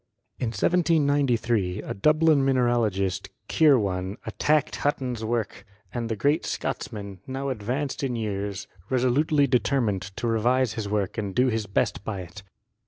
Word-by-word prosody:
In 125 - -1
1793 125 - +1
a - - -4
Dublin 150 +5 +4
mineralogist, 120 -8 +1 0.2
Kirwan, 100 - +2
attacked 150 0 +1
Hut 145 - +1
ton's 125 -4 -4
work, 115 -1 -2 0.3
and 115 -1 -3
the 110 - -1
great 145 +8 +1
Scotsman, 100 -3 -4
now 135 +1 -3
advanced 130 +5 -3
in 130 -3 -1
years, 100 -2 -3 0.2
resolutely 135 +4 +3
determined 125 -6 +1
to 95 +5 -6
revise 120 +1 +2
his 110 -2 -4
work 105 0 -1
and 100 -3 -4
do 125 +1 +4
his 110 -2 -2
best 100 -1 0
by 100 -3 -4
it. 90 +3 -10
120 Hz, 140 wpm, -26 LUFS, 100-135 Hz, 0.3 s, Dublin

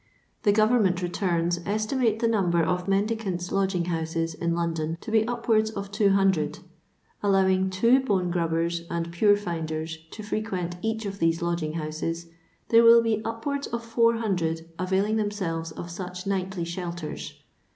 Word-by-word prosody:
The 205 - +4
Government 210 -4 +3
returns 175 -1 0
esti 215 +6 -1
mate 230 -5 +2
the 230 - +3
number 180 -7 +2
of 180 +3 -1
mendicants' 195 -3 -1
lodgin^houscs 170 -4 -1
in 170 0 -1
London 165 -1 -2
to 220 - -7
be 220 0 +3
upwards 230 -2 +1
of 200 -2 -6
200. 195 -7 +2 0.6
Allowing 190 -1 +3
two 230 +8 +4
bone 190 -9 0
grubbers 170 0 0
and 170 0 -3
pure 205 +4 +4
finders 160 -4 -4
to 215 - -9
frequent 190 -5 -3
each 220 0 -2
of 195 0 -5
these 165 0 +1
lodging 170 -3 -1
houses, 165 +1 -3 0.4
there 230 0 +7
will 230 0 +8
be 220 -2 0
upwards 275 +6 -3
of 235 0 -4
400 220 -9 +1
availing 190 +4 +1
themselves 185 -6 -2
of 170 +2 -7
such 180 +1 -6
nightly 190 -2 -2
shelters. 170 -2 -5
190 Hz, 145 wpm, -26 LUFS, 170-215 Hz, 0.6 s, will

